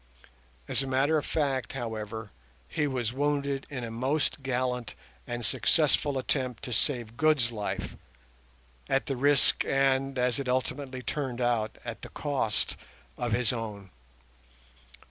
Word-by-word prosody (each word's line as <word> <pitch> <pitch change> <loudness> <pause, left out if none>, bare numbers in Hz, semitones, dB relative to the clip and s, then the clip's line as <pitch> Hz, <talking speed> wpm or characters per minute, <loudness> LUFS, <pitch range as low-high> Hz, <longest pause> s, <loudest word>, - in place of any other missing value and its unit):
As - - +1
a 135 - -3
matter 140 +4 +3
of - - -6
fact, 135 -6 0
however, 110 -4 -4 0.4
he 150 -2 0
was 125 -4 -1
wounded 140 0 0
in 130 -4 -4
a 115 - -4
most 135 +6 0
gallant 125 -2 -1 0.3
and 120 -1 -3
successful 145 +4 +3
attempt 130 -2 -1
to 125 - -3
save 120 -2 0
Good's 150 -6 +4
life, 105 -3 -3 0.9
at 135 - +2
the 135 - -1
risk 140 +2 +4
and, 135 0 +2
as 125 0 +2
it 135 -2 -2
ultimately 130 +1 -1
turned 130 -4 -2
out, 120 -3 +1
at - - -5
the - - -8
cost 140 -7 -1 0.4
of 120 -2 -1
his 120 0 +2
own. 105 -5 -5
130 Hz, 140 wpm, -29 LUFS, 120-140 Hz, 0.9 s, Good's